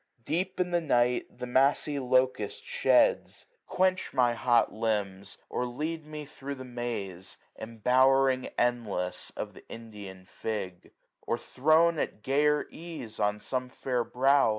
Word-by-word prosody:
Deep 185 +4 -1
in 180 -1 0
the 175 0 +2
night 125 -5 +2
the - - -4
massy 140 +3 +2
locust 130 - +1
sheds. 485 0 +3
SUMMER. - - -16
75 - - -8
Quench 185 0 +2
my 125 -2 +4
hot 120 0 +2
limbs; 100 -3 -2
or 125 - -2
lead 155 +5 -4
me 150 -1 -6
thro* 140 0 -7
the 130 -1 -9
maze, 115 -7 -5 0.2
670 110 +1 -8
Embowering 130 +3 +3
endless, 115 -7 -1
of - - -4
the - - -14
Indian 105 -5 -9
fig; 95 -3 -5 0.4
Or 115 - +1
thrown 155 +6 +3
at 105 - -3
gayer 150 +2 +2
ease, 160 -10 -8
on 105 0 +1
some 125 +3 -2
fair 125 -1 -1
brow. 135 +3 +3
125 Hz, 150 wpm, -29 LUFS, 115-150 Hz, 0.4 s, my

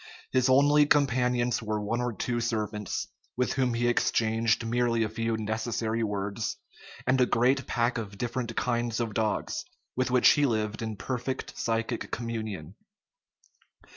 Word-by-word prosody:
His 130 0 +3
only 145 +2 +5
companions 125 -4 +2
were 110 -1 -2
one 115 +4 -1
or 125 0 0
two 120 +3 -2
servants, 110 -3 -2 0.3
with 125 0 +1
whom 130 -3 +1
he 120 +1 +1
exchanged 115 -1 +2
merely 115 0 +1
a 110 - -1
few 115 0 -1
necessary 110 +1 -2
words, 105 0 -2 0.5
and 130 0 +3
a 125 - +4
great 130 +3 +2
pack 120 0 +1
of 100 -3 -7
different 120 0 -3
kinds 120 -1 0
of 115 -2 -2
dogs, 110 -1 -1 0.3
with 130 0 0
which 125 0 +6
he 145 -1 +4
lived 110 -2 -1
in 110 -1 -3
perfect 130 +4 -4
psychic 115 +1 -2
communion. 110 -8 -4
115 Hz, 145 wpm, -28 LUFS, 110-125 Hz, 0.5 s, which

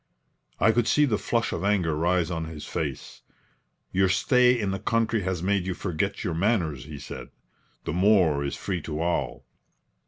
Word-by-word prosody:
I 110 - +5
could 120 0 +1
see 150 - +4
the 110 -7 0
flush 115 -1 0
of 85 - -3
anger 95 -6 +1
rise 85 +2 +1
on 80 -1 -2
his 80 -2 -8
face. - - -5 0.7
"Your 95 0 +2
stay 125 +7 +4
in 100 -3 -1
the 95 - -3
country 115 +1 +1
has 90 -2 -2
made 95 -1 +1
you 95 - -2
forget 95 +2 -2
your 90 -6 -1
manners," 85 - 0
he 75 -1 -8
said. 70 - -8 0.5
"The 80 - -3
moor 90 -6 +3
is 70 - -3
free 90 -3 -3
to 75 0 -5
all." 85 +1 -2
90 Hz, 180 wpm, -26 LUFS, 80-105 Hz, 0.7 s, I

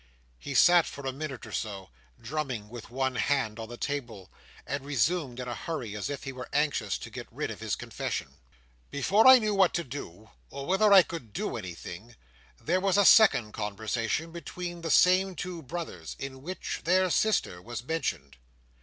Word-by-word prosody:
He 140 - -6
sat 175 +2 +6
for 140 - -8
a 135 - -1
minute 140 -4 -6
or - - -10
so, 100 -4 -5 0.3
drumming 125 -4 -4
with 120 -1 -9
one 130 +1 -1
hand 115 -4 0
on 110 0 -6
the 120 - -8
table; 120 -11 -5 0.3
and 140 0 -3
resumed 140 -1 0
in 125 - -5
a 120 - -3
hurry, 120 -6 -5
as 105 - -3
if 145 - -5
he 135 - -4
were 125 -2 -8
anxious 140 -9 0
to - - -9
get - - -7
rid - - -3
of - - -8
his - - -2
confession. - - -5 0.5
"Before 200 - +3
I 260 0 +11
knew 215 -3 0
what 195 -3 +3
to 170 - 0
do, 110 - -9 0.2
or 140 - -7
whether 195 +4 +3
I 195 -2 +9
could 125 -13 -8
do - - -3
anything, 95 +2 -8 0.4
there 180 +4 0
was 195 0 +2
a 205 - +5
second 180 - +6
conversation 110 +9 -2
between 175 +1 -6
the 165 - -4
same 185 +3 +4
two 175 -1 -5
brothers, 140 - -6
in 130 -1 -7
which 185 +6 -5
their 185 +1 +3
sister 205 - +1
was 120 +3 -6
mentioned. 80 - -3
140 Hz, 185 wpm, -29 LUFS, 115-175 Hz, 0.5 s, I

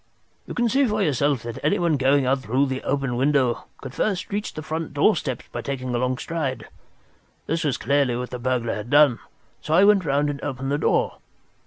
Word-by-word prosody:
"You - - -6
can 240 0 +2
see 270 +3 +2
for 210 -1 0
yourself 145 -5 +1
that 115 -1 -6
anyone 160 +2 +2
going 135 0 +3
out 135 +2 +2
through 130 +4 +1
that 130 -1 -4
open 135 -4 -1
window 135 -3 +1 0.2
could 130 -1 -9 0.3
reach 205 +1 -2
the 155 - -6
front 160 -1 -4
doorstep 145 - +1
by 120 - -4
taking 130 -1 -4
a 120 - 0
long 125 0 0
stride. 155 -5 -3 0.8
This 165 +2 -1
was 145 -6 0
clearly 140 -1 +1
what 125 +1 -4
the 125 - -5
burglar 120 -2 -1
had 105 +2 -6
done, 145 -4 +5 0.4
so 155 - 0
I 185 - +6
went 200 -2 +5
round 145 -1 +1
and 140 - -8
opened 135 -1 -3
the 145 - 0
door. - - +1
140 Hz, 200 wpm, -23 LUFS, 125-155 Hz, 0.8 s, I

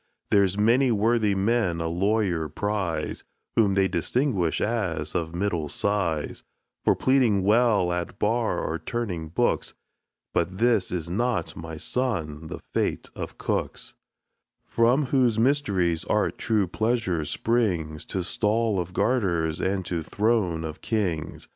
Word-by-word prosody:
There's 100 -1 +3
many 120 +5 +4
worthy 110 -1 +2
men 95 -4 +1
a 85 - -2
lawyer 90 -2 0
prize, 95 -4 -2 0.3
Whom 100 -4 +3
they 95 -1 +3
distinguish 95 - 0
as 90 -9 -1
of 80 0 -2
middle 85 -5 -1
size, 95 -7 -1 0.4
For - - +4
pleading 125 -7 +3
well 105 -4 +3
at 90 -1 -4
bar 115 +2 +1
or - - -2
turning 95 -9 -3
books; 120 +9 0 0.6
But 90 +2 0
this 115 -4 +2
is 85 -2 -3
not, 120 +7 -1
my 80 -1 -7
son, 80 - -2
the - - -7
fate - - -1
of - - -6
cooks, - - -3 0.7
From 120 +5 +2
whose 125 -4 +2
mysterious 100 - +2
art - - 0
true 105 -3 +2
pleasure 105 -3 0
springs, 85 -6 0
To 95 - -3
stall 105 +2 +1
of 90 +1 -4
garters, 85 -10 +1
and 95 -1 -1
to 85 -1 -2
throne 100 -2 0
of 80 -1 -6
kings. 90 -8 -2
100 Hz, 135 wpm, -26 LUFS, 85-115 Hz, 0.7 s, many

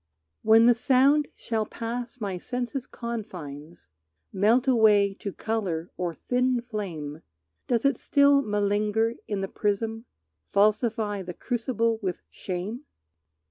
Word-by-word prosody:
When 225 +1 +6
the 240 - +7
sound 275 +5 +3
shall 220 -2 -2
pass 235 +2 -5
my 195 -4 -3
sense's 250 +4 -4
confines, 170 - -7 0.4
Melt 230 +7 +3
away 210 -5 +5
to 200 - -4
color 190 -7 -3
or 175 -2 -3
thin 250 +4 +1
flame, 175 -10 -5 0.5
Does 235 0 +1
it 275 -3 +3
still 280 -1 +4
malinger 210 +1 +1
in 205 -2 -2
the 195 - -2
prism, 220 +3 -2 0.5
Falsify 210 0 +2
the 180 -2 -7
crucible 230 -2 -1
with 185 -3 -3
shame? 195 +8 -5
220 Hz, 120 wpm, -26 LUFS, 200-240 Hz, 0.5 s, the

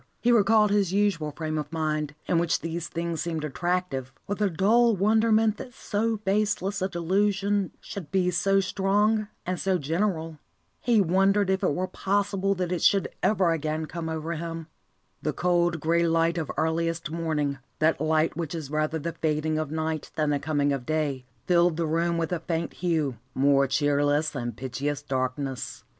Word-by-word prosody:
He 240 - +3
recalled 215 -2 +4
his 200 -3 +2
usual 195 -6 +1
frame 155 0 -3
of 150 0 -5
mind, 155 -2 -2
in 170 - +2
which 170 0 +1
these 165 +1 -4
things 170 -2 -3
seemed 160 -1 -3
attractive, 150 -3 -2
with 205 +1 -4
a 205 - +3
dull 220 +6 +3
wonderment 220 +2 +3
that 245 - -9
so 220 +2 -1
baseless 200 -1 0
a 190 - 0
delusion 195 +2 +1
should 185 -7 -8
be 185 -2 +2
so 195 +3 +2
strong 205 +3 +1 0.2
and 180 -1 -2
so 190 -1 +1
general. 165 0 -2 0.4
He 235 -4 +3
wondered 195 +2 +3
if 190 - 0
it 145 - +1
were 185 - 0
possible 195 +1 0
that 180 -1 -2
it 175 -3 -1
should 195 -1 +3
ever 190 -5 +3
again 155 0 -1
come 165 +1 -5
over 160 +1 -3
him. 165 0 -5 0.6
The - - -1
cold, 175 -1 +1
grey 170 +2 +2
light 165 +1 +2
of 155 - -3
earliest 165 0 -1
morning, 155 -4 -1 0.2
that 155 -2 +2
light 155 0 +2
which 170 -1 -4
is 150 -4 -6
rather 155 +1 0
the 165 +2 -4
fading 155 0 0
of 155 -2 -2
night 160 0 -3
than 155 -2 +1
the 145 - +1
coming 145 -1 +1
of 135 -3 -3
day, 145 -3 -1 0.2
filled 175 -2 +3
the 170 - 0
room 170 +2 0
with 165 0 -1
a 175 - 0
faint 165 0 -3
hue, 160 -8 -1 0.2
more 140 0 +4
cheerless 145 +2 +2
than 120 -4 -4
pitchiest 140 +4 -4
darkness. 130 0 -3
165 Hz, 175 wpm, -26 LUFS, 155-195 Hz, 0.6 s, recalled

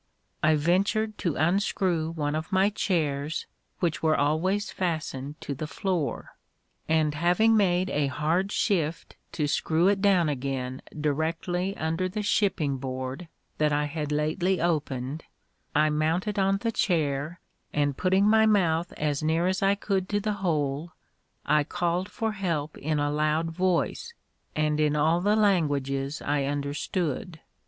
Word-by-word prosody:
I 155 0 +4
ventured 200 +7 +1
to 170 -6 -1
unscrew 175 -1 +1
one 150 -2 -1
of 155 +1 -4
my 190 +2 +3
chairs, 155 -7 -1 0.4
which 170 -4 0
were 155 -1 +3
always 180 +8 +1
fastened 155 -5 -3
to 140 - -4
the 150 +3 -5
floor; 180 -4 -2 0.6
and 155 -2 +2
having 180 +8 +3
made 185 -3 +2
a 145 -1 +1
hard 160 +8 0
shift 170 -8 -1 0.2
to 150 - 0
screw 160 +4 +2
it 200 -1 +1
down 190 -5 +4
again 130 -2 -3 0.2
directly 165 +6 -1
under 165 +4 -1
the 210 +3 -3
shipping 165 -10 +1
board 130 +4 -5 0.3
that 150 -1 +3
I 145 0 +1
had 150 0 -4
lately 160 +5 +1
opened, 150 -3 -1 0.5
I 155 +1 +4
mounted 165 +7 0
on 195 0 +3
the 230 +3 -1
chair, 155 -4 0 0.3
and 145 -2 0
putting 190 +5 +2
my 220 0 +5
mouth 175 -5 +2
as 145 -1 -1
near 160 +2 +1
as 185 +1 0
I 195 0 +3
could 195 -2 -1
to 205 - +1
the 210 +1 -1
hole, 155 -2 -1 0.5
I 150 -1 +3
called 175 +5 -1
for 225 -1 -2
help 165 -7 -2
in 155 +1 -1
a 145 0 0
loud 155 +2 0
voice, 185 - -1 0.4
and 150 0 +1
in 150 -1 +2
all 160 +3 +2
the 205 +3 +3
languages 145 -9 +1
I 145 -1 0
understood. 145 +4 -2
160 Hz, 145 wpm, -27 LUFS, 150-190 Hz, 0.6 s, my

